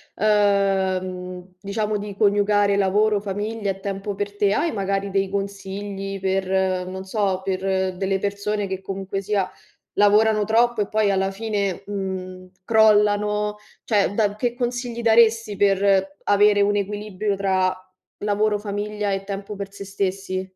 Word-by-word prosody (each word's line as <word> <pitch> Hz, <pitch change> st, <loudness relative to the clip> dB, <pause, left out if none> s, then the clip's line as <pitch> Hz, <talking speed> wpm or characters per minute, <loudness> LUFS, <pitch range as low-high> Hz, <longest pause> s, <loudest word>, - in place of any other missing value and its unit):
uhm, 190 Hz, -3 st, 0 dB
diciamo, 210 Hz, +1 st, -2 dB
di 205 Hz, -1 st, -6 dB
coniugare 205 Hz, -1 st, +3 dB
lavoro, 205 Hz, +2 st, +2 dB
famiglia 205 Hz, +1 st, -3 dB
e 195 Hz, 0 st, -9 dB
tempo 195 Hz, 0 st, -4 dB
per 205 Hz, 0 st, -4 dB
te, 200 Hz, -1 st, +3 dB
hai, 330 Hz, +7 st, +1 dB
magari, 195 Hz, -1 st, -1 dB
dei 195 Hz, 0 st, 0 dB
consigli 195 Hz, 0 st, -4 dB
per, 190 Hz, -1 st, 0 dB
non 190 Hz, +1 st, -6 dB
so, 190 Hz, -1 st, -1 dB
per 190 Hz, -1 st, -1 dB
delle 195 Hz, 0 st, 0 dB
persone 200 Hz, 0 st, -2 dB
che, 190 Hz, 0 st, -4 dB
comunque 195 Hz, 0 st, -4 dB
sia, 195 Hz, -1 st, -1 dB, 0.5 s
lavorano 210 Hz, +1 st, +4 dB
troppo 235 Hz, +1 st, +2 dB
e 205 Hz, -, +1 dB
poi, 215 Hz, -2 st, +2 dB
alla 195 Hz, 0 st, +1 dB
fine, 200 Hz, -3 st, -2 dB
mhmm, 185 Hz, -2 st, -5 dB
crollano? 210 Hz, -1 st, +3 dB, 0.3 s
Cioè, 205 Hz, -2 st, +1 dB
da 210 Hz, -2 st, +1 dB
che 240 Hz, +1 st, 0 dB
consigli 240 Hz, -1 st, -3 dB
daresti 225 Hz, -2 st, +4 dB
per 195 Hz, -1 st, +2 dB
avere 205 Hz, 0 st, +4 dB
un 205 Hz, 0 st, +2 dB
equilibrio 205 Hz, 0 st, -2 dB
tra 185 Hz, -1 st, +1 dB, 0.4 s
lavoro, 210 Hz, 0 st, +1 dB
famiglia 205 Hz, 0 st, -3 dB
e 195 Hz, 0 st, -2 dB
tempo 200 Hz, +1 st, -5 dB
per 200 Hz, 0 st, -6 dB
se 200 Hz, -, -8 dB
stessi? 195 Hz, -1 st, -3 dB
200 Hz, 140 wpm, -23 LUFS, 195-210 Hz, 0.5 s, lavorano